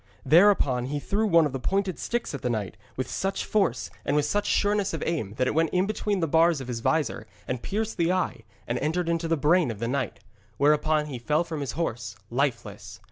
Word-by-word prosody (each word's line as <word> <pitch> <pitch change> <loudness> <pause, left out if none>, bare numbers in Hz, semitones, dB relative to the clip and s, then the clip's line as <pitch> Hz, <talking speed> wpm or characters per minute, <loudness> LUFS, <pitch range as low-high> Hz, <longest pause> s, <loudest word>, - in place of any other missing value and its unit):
Thereupon 150 -6 +4
he 145 +2 -2
threw 210 +8 0
one 165 -4 +5
of 145 - -3
the 135 - -3
pointed 190 +5 -1
sticks 240 -7 -2
at 140 - -5
the 125 - -1
knight, 110 -5 -2 0.2
with 130 -1 -2
such 195 0 -2
force 195 - 0
and 140 - 0
with 150 -1 +2
such 205 +6 0
sureness 205 -3 +1
of - - -4
aim 110 - -2
that 130 - +2
it - - 0
went 165 0 +2
in 185 +1 +1
between 205 -2 -1
the 165 - +1
bars 165 0 +4
of 130 - -7
his 120 -2 -3
vizor 145 -6 0 0.2
and 125 -2 -3
pierced 220 +2 -3
the 170 0 +2
eye, 185 -10 -1 0.2
and 120 - -2
entered 165 +4 -1
into 165 0 0
the 165 0 +1
brain 155 +2 +3
of 110 - -4
the 115 +3 -3
knight. 130 -2 -2 0.4
Whereupon 150 +1 +3
he 135 -5 -6
fell 150 +7 +1
from 160 -3 -5
his 135 -4 -3
horse 120 -10 -3 0.2
lifeless. 125 -1 -2
155 Hz, 225 wpm, -26 LUFS, 130-180 Hz, 0.4 s, one